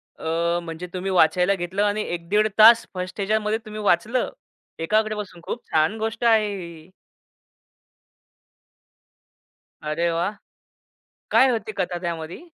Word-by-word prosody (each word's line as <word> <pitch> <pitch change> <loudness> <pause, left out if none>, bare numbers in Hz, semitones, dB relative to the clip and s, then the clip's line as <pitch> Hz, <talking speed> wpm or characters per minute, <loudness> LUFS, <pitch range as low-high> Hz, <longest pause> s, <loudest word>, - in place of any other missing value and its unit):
अ, 170 +1 -1
म्हणजे 165 +2 -7
तुम्ही 190 +1 -3
वाचायला 180 +2 +3
घेतलं, 185 +3 -2
आणि 210 +1 0
1-1.5 190 +5 +1
तास 230 +2 +8
फर्स्ट 185 +2 -6
ह्याच्यामध्ये 215 +2 0
तुम्ही 215 0 -7
वाचलं, 210 +6 +1 0.5
एकाग्र 215 +6 +1
बसून. 195 -4 -7
खूप 240 - -5
छान 155 +7 +2
गोष्ट 225 +1 -3
आहे 215 -3 +3
ही. 170 -2 -10 2.9
अरे 160 +3 -1
वाह! 175 +4 -1 1.0
काय 255 +4 +6
होती 220 -3 -2
कथा 180 -1 -1
त्यामध्ये? 170 -1 -5
190 Hz, 120 wpm, -23 LUFS, 170-215 Hz, 2.9 s, तास